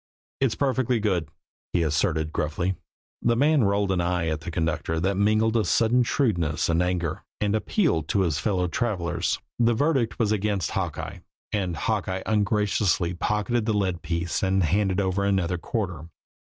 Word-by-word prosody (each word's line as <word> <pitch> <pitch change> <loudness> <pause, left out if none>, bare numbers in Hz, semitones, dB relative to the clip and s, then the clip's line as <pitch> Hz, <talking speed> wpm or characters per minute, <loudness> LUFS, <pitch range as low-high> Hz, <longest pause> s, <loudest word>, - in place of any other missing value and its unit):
"It's 135 -5 +1
perfectly 130 -3 +1
good," 90 -8 0 0.4
he 85 - +2
asserted 80 0 0
gruffly. 85 +5 -1 0.5
The 120 - +2
man 145 0 +3
rolled 100 0 +1
an 90 -2 +1
eye 85 -1 0
at 80 0 -2
the 85 - -6
conductor 80 -1 -1
that 95 +4 +1
mingled 110 +3 +2
a 110 - +3
sudden 115 +6 +3
shrewdness 85 - 0
and 85 +1 +2
anger, 90 -3 -1 0.2
and 105 -1 +1
appealed 110 - +1
to 100 - +1
his 80 -5 0
fellow 90 -2 0
travelers. 90 -2 -1 0.2
The 120 -1 +3
verdict 135 -4 +1
was 110 -3 +1
against 105 -2 0
Hawkeye, - - -3 0.3
and 95 -5 -1
Hawkeye 95 -1 -1
ungraciously 105 -4 +1
pocketed 105 +5 -1
the 110 - +2
lead 95 -4 0
piece 85 0 -2
and 95 0 +2
handed 95 +3 +1
over 95 0 0
another 95 -3 +1
quarter. 90 -6 -3
95 Hz, 160 wpm, -25 LUFS, 85-110 Hz, 0.5 s, man